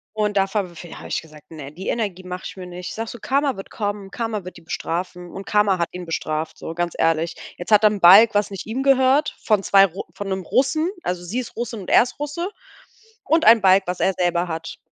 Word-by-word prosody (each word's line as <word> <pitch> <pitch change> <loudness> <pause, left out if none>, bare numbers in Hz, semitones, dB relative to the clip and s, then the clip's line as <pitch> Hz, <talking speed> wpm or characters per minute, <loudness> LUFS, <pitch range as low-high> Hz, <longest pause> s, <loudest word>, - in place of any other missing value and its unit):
Und 210 -1 0
da 195 - +4
v 195 -3 -3
v 170 - -10
hab - - -10
ich - - -2
gesagt, 150 -1 -17
ne, 145 -3 -9
die 185 +5 -9
Energie 200 -5 -2
mache 180 0 -7
ich - - -7
mir 185 -1 -8
nicht. 180 0 -7
Sage 225 0 -5
so: 240 - -8
"Karma 275 -2 0
wird 195 - -9
kommen, 205 -2 -4
Karma 225 -4 -3
wird 185 - -9
die - - -14
bestrafen." 175 +2 -5
Und 195 0 -8
Karma 205 -3 +2
hat 170 - 0
ihn 180 -1 -7
bestraft, 155 -1 -3
so 165 - -7
ganz 175 0 -2
ehrlich. 165 +1 +1 0.2
Jetzt 175 +5 -8
hat 210 0 +6
er 215 - +7
'n 205 -1 -4
Balg 200 +5 +8
was 205 0 +1
nicht 195 +1 -7
ihm 255 +5 -2
gehört 270 +2 +3
von 210 -3 +1
zwei 195 0 +6
Ru 180 +2 -7
von 200 -1 -6
'nem 190 0 -2
Russen 310 - +1
also 180 - -3
sie 210 +8 -3
ist 250 - -7
Russin 230 -3 -4
und - - -9
er - - +6
ist 250 - -9
Russe 295 +5 -3 0.8
und 320 +2 +2
ein 225 -1 +7
Balg, 190 0 +5
was 180 0 -3
er 190 - +2
selber 175 0 +1
hat. 165 0 -6
195 Hz, 245 wpm, -22 LUFS, 175-225 Hz, 0.8 s, Balg